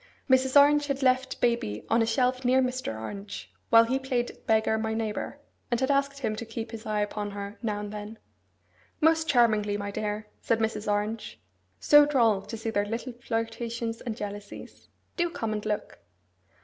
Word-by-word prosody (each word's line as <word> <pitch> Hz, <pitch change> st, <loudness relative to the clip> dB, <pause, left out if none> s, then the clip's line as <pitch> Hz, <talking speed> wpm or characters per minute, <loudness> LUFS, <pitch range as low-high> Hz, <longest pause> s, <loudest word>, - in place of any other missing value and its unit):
Mrs. 260 Hz, +1 st, +5 dB
Orange 290 Hz, +1 st, +5 dB
had 275 Hz, -1 st, -2 dB
left 260 Hz, 0 st, +2 dB
baby 235 Hz, -, 0 dB
on 230 Hz, +1 st, +3 dB
a 225 Hz, -, +2 dB
shelf 255 Hz, +2 st, +1 dB
near 255 Hz, +1 st, +4 dB
Mr. 255 Hz, -, -2 dB
Orange 110 Hz, -, -7 dB, 0.2 s
while 230 Hz, 0 st, +8 dB
he 260 Hz, +4 st, 0 dB
played 255 Hz, -2 st, -1 dB
at -, -, -23 dB
beggar 220 Hz, -1 st, +3 dB
my 220 Hz, 0 st, -1 dB
neighbour, 220 Hz, -2 st, -3 dB, 0.3 s
and 240 Hz, -2 st, +1 dB
had 265 Hz, +2 st, +1 dB
asked 275 Hz, 0 st, +1 dB
him 215 Hz, -4 st, -1 dB
to 230 Hz, -, -4 dB
keep 225 Hz, 0 st, -6 dB
his 225 Hz, -1 st, -8 dB
eye 210 Hz, -1 st, 0 dB
upon 205 Hz, 0 st, -3 dB
her 200 Hz, +1 st, -7 dB
now 210 Hz, -3 st, -2 dB
and 205 Hz, 0 st, -6 dB
then. 210 Hz, +1 st, -7 dB, 0.8 s
'Most 320 Hz, 0 st, +3 dB
charmingly, 215 Hz, -5 st, +3 dB
my 205 Hz, 0 st, -4 dB
dear!' 210 Hz, +1 st, -3 dB, 0.2 s
said 230 Hz, -, +1 dB
Mrs. 220 Hz, -1 st, -1 dB
Orange. 210 Hz, +2 st, -2 dB, 0.4 s
'So 295 Hz, 0 st, +7 dB
droll 230 Hz, -8 st, +3 dB
to 225 Hz, -, -7 dB
see 225 Hz, +1 st, -3 dB
their 205 Hz, -1 st, 0 dB
little 230 Hz, +3 st, -4 dB
flirtations 230 Hz, 0 st, -3 dB
and 230 Hz, -3 st, -4 dB
jealousies! 205 Hz, 0 st, -8 dB, 0.3 s
Do 345 Hz, -1 st, +1 dB
come 225 Hz, -10 st, -3 dB
and 210 Hz, -1 st, -3 dB
look! 210 Hz, -, -3 dB
225 Hz, 185 wpm, -28 LUFS, 210-255 Hz, 0.8 s, while